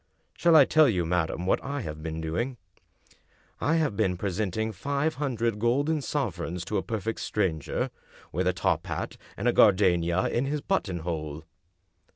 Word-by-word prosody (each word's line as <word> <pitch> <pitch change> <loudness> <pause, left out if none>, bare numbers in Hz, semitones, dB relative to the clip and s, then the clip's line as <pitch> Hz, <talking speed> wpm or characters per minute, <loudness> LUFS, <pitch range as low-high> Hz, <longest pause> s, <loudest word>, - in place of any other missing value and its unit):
Shall 170 -1 +4
I 145 -3 +9
tell 155 -1 +5
you, 90 -6 0
madam, 85 +1 -1
what - - +1
I 140 0 -3
"have 75 -6 -6
been 80 0 -4
doing? 120 +11 -2 1.0
I 160 - +2
have 155 -10 +1
been 90 -2 +1
presenting 105 +3 -1
five 140 - -1
hundred 115 -6 0
golden 140 +7 +1
sovereigns 90 - -3
to 105 +2 -1
a - - +1
perfect 110 +1 -3
stranger, 90 -8 -1 0.4
with 90 +3 0
a 90 - +3
top 90 - 0
hat, - - -4 0.2
and 105 - -1
a 120 - +4
gardenia 90 -3 +4
in 120 - 0
his 150 +2 -1
buttonhole." 85 - -2
105 Hz, 160 wpm, -27 LUFS, 85-135 Hz, 1.0 s, I